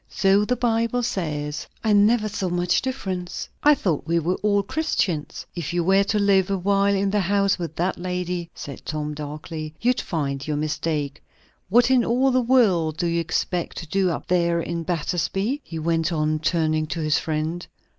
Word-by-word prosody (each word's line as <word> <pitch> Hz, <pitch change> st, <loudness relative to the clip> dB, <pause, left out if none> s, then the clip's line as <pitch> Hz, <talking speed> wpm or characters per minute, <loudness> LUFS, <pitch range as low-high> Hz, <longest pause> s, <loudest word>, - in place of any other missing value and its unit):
"So 195 Hz, +1 st, +3 dB
the 250 Hz, -, +1 dB
Bible 235 Hz, 0 st, 0 dB
says." 150 Hz, -9 st, -3 dB, 0.2 s
"I 220 Hz, -2 st, +3 dB
never 215 Hz, +2 st, +4 dB
saw 195 Hz, -3 st, -2 dB
much 175 Hz, 0 st, +1 dB
difference. 190 Hz, -9 st, -4 dB
I 295 Hz, 0 st, +6 dB
thought 170 Hz, -, -1 dB
we 170 Hz, +1 st, +2 dB
were 170 Hz, +2 st, +1 dB
all 205 Hz, -1 st, +2 dB
Christians." 200 Hz, -, -2 dB
"If 170 Hz, -2 st, -4 dB
you 175 Hz, -1 st, +1 dB
were 195 Hz, +3 st, +4 dB
to 210 Hz, -, 0 dB
live 200 Hz, -2 st, +3 dB
a 195 Hz, -, +1 dB
while 200 Hz, +2 st, +2 dB
in 195 Hz, 0 st, +1 dB
the 210 Hz, -, +2 dB
house 200 Hz, 0 st, +2 dB
with 165 Hz, -2 st, -5 dB
that 180 Hz, +2 st, -1 dB
lady," 180 Hz, -1 st, -3 dB
said 140 Hz, -2 st, -8 dB
Tom 150 Hz, -1 st, -3 dB
darkly, 155 Hz, +1 st, -6 dB
"you'd 245 Hz, +2 st, +1 dB
find 140 Hz, -4 st, -3 dB
your 150 Hz, -1 st, -1 dB
mistake. 150 Hz, -1 st, -2 dB, 0.5 s
What 240 Hz, +5 st, +4 dB
in 255 Hz, -2 st, +5 dB
all 255 Hz, +4 st, +2 dB
the 255 Hz, 0 st, +3 dB
world 195 Hz, -11 st, +3 dB
do 175 Hz, -, -1 dB
you 170 Hz, 0 st, +1 dB
expect 175 Hz, +1 st, -2 dB
to 165 Hz, -, -6 dB
do 190 Hz, +3 st, +1 dB
up 165 Hz, -, -3 dB
there 170 Hz, -1 st, +2 dB
at 170 Hz, -1 st, -3 dB
Battersby?" 195 Hz, -, -1 dB
he 165 Hz, -, -7 dB
went 165 Hz, 0 st, 0 dB
on, 155 Hz, -1 st, 0 dB
turning 155 Hz, -1 st, +1 dB
to 170 Hz, +1 st, -4 dB
his 155 Hz, 0 st, +2 dB
friend. 160 Hz, +2 st, -3 dB
175 Hz, 185 wpm, -23 LUFS, 160-205 Hz, 0.5 s, I